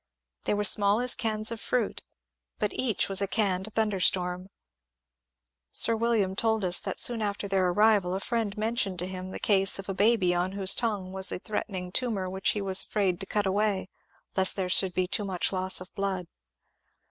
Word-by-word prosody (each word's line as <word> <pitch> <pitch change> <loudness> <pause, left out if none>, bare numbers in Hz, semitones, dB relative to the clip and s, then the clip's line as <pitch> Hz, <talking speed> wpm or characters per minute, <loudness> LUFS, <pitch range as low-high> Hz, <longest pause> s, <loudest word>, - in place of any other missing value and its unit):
They - - 0
were 205 - -1
small 205 +1 +4
as 250 0 +2
cans 220 -2 -1
of 230 - -6
fruit, 240 -5 -2 0.6
but 210 - -2
each 245 -5 -1
was 195 0 +3
a 200 - 0
canned 195 -1 -1
thun 220 -1 +1
derstorm. 180 -1 0 1.2
Sir 230 - +3
William 220 -4 0
told 220 0 0
us 175 -1 +4
that - - -5
soon 235 -2 +1
after 205 -1 -3
their 190 -2 +1
arrival 200 -1 +2
a - - -2
friend 220 -1 -3
mentioned 215 -3 -1
to 175 - -3
him 185 0 -7
the - - -5
case 195 -2 +3
of 195 - -8
a 195 - -3
baby 200 -2 +2
on 180 +2 -1
whose 195 -1 +2
tongue 205 -6 -2
was 190 0 +5
a - - -2
threatening 185 -2 -5
tumour 215 -4 -1
which 190 +1 -1
he 210 - -3
was 190 -1 +5
afraid 190 -4 -1
to 195 - -7
cut 210 -1 -1
away, 195 -1 -1 0.5
lest 190 -1 +4
there 185 -2 -3
should 185 -1 +2
be 185 -1 0
too 210 +3 -2
much 190 -1 -2
loss 185 0 +2
of 185 - -12
blood. 195 -2 -3
195 Hz, 195 wpm, -27 LUFS, 185-215 Hz, 1.2 s, was